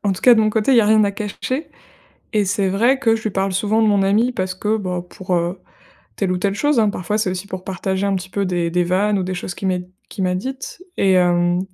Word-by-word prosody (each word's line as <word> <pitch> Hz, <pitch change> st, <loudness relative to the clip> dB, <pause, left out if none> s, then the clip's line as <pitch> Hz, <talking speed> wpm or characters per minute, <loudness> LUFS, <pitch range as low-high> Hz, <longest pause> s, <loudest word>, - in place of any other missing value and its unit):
en 200 Hz, -, +2 dB
tout 185 Hz, -, -7 dB
cas 250 Hz, -, +8 dB
de 220 Hz, -, +3 dB
mon 215 Hz, -, +3 dB
côté, 220 Hz, +4 st, +1 dB
il -, -, +5 dB
y -, -, +8 dB
a 210 Hz, -, +2 dB
rien 215 Hz, 0 st, +5 dB
à 200 Hz, -, +1 dB
cacher, 215 Hz, +8 st, -4 dB, 0.6 s
et 210 Hz, -2 st, +2 dB
c'est 195 Hz, 0 st, 0 dB
vrai 235 Hz, +8 st, +2 dB
que 225 Hz, -4 st, +3 dB
je 220 Hz, -, -8 dB
lui 215 Hz, -, 0 dB
parle 195 Hz, 0 st, -1 dB
souvent 215 Hz, +4 st, +1 dB
de 215 Hz, -, +4 dB
mon 200 Hz, -1 st, +3 dB
ami 215 Hz, +6 st, +2 dB
parce 185 Hz, -5 st, -3 dB
que, 210 Hz, +3 st, 0 dB
bah, 180 Hz, -4 st, -3 dB
pour, 185 Hz, -1 st, -4 dB
heu, 175 Hz, +2 st, -1 dB, 0.6 s
telle 190 Hz, -3 st, 0 dB
ou 180 Hz, -, 0 dB
telle 200 Hz, +1 st, 0 dB
chose 290 Hz, +1 st, +2 dB
hein 215 Hz, -2 st, +3 dB
parfois 205 Hz, +3 st, -2 dB
c'est 195 Hz, -, 0 dB
aussi 185 Hz, +1 st, -4 dB
pour 185 Hz, -2 st, -7 dB
partager 190 Hz, +1 st, -3 dB
un 195 Hz, -, +1 dB
petit 185 Hz, 0 st, -5 dB
peu 200 Hz, -, -1 dB
des 175 Hz, -2 st, -1 dB
des 175 Hz, 0 st, +2 dB
vannes 195 Hz, +3 st, +1 dB
ou -, -, -1 dB
des 185 Hz, 0 st, -3 dB
choses 175 Hz, 0 st, -5 dB
qu'il 195 Hz, -, -4 dB
m'ait 180 Hz, -1 st, -2 dB, 0.2 s
qu'il 190 Hz, -, -4 dB
m'a 180 Hz, 0 st, 0 dB
dites, 265 Hz, -, -6 dB, 0.2 s
et 190 Hz, -1 st, +3 dB
hem, 175 Hz, -1 st, +3 dB
195 Hz, 275 wpm, -20 LUFS, 185-215 Hz, 0.6 s, cas